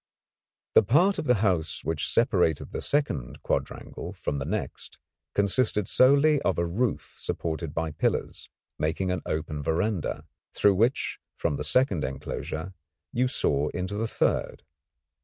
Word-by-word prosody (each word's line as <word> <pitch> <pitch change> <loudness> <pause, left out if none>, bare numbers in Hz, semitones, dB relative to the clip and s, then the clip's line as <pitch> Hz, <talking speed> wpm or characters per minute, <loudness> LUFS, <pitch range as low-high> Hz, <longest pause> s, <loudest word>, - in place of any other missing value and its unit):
The - - +8
part 170 - +3
of - - -3
the 125 -6 +2
house 85 -5 0
which 80 -3 -1
separated 95 - +2
the - - -4
second 110 - -1
quadrangle - - -3
from 70 - -3
the 70 - -3
next - - -4 0.4
consisted 105 0 +1
solely 140 +3 +5
of 95 - +1
a 85 - +1
roof 105 +7 -1
supported 80 -1 -3
by 80 -1 -1
pillars, - - -2 0.3
making 90 +4 0
an 90 - -1
open 75 -1 -2
verandah, 85 +4 -1 0.3
through 100 - +5
which 115 +7 +1 0.2
from 75 - 0
the - - -3
second 125 - +2
enclosure 80 +6 -4 0.4
you 125 +2 +2
saw 75 - +1
into 90 +3 -3
the 110 +2 -1
third. - - -1
95 Hz, 140 wpm, -27 LUFS, 80-120 Hz, 0.4 s, The